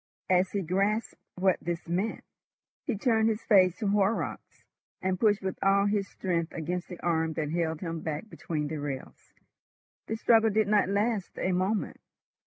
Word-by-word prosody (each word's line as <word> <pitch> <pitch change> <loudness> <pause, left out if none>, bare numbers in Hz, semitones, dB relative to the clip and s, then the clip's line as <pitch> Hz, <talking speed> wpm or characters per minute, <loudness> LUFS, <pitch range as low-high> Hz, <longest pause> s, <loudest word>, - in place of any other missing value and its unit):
As 185 0 +3
he 200 -2 0
grasped 195 +5 0 0.2
what 185 0 +2
this 170 0 -4
meant, 185 +6 -1 0.6
he 245 -7 0
turned 225 0 +3
his 220 0 -2
face 185 -4 +5
to 210 - -2
Horrocks, 200 +2 -1 0.4
and 185 -1 -1
pushed 210 -3 +3
with 190 -1 -3
all 195 +1 +4
his 205 -1 +1
strength 170 -3 -2
against 175 +2 -3
the 180 - -9
arm 160 -2 +1
that 150 -1 -2
held 160 -2 -1
him 165 -3 -3
back 155 +6 -4
between 155 -7 -4
the 155 +1 -4
rails. 145 -2 -6 0.8
The 220 - -2
struggle 225 0 +4
did 215 0 +2
not 205 -2 +3
last 205 0 -1
a 185 - 0
moment. 190 +4 -1
190 Hz, 170 wpm, -29 LUFS, 170-210 Hz, 0.8 s, face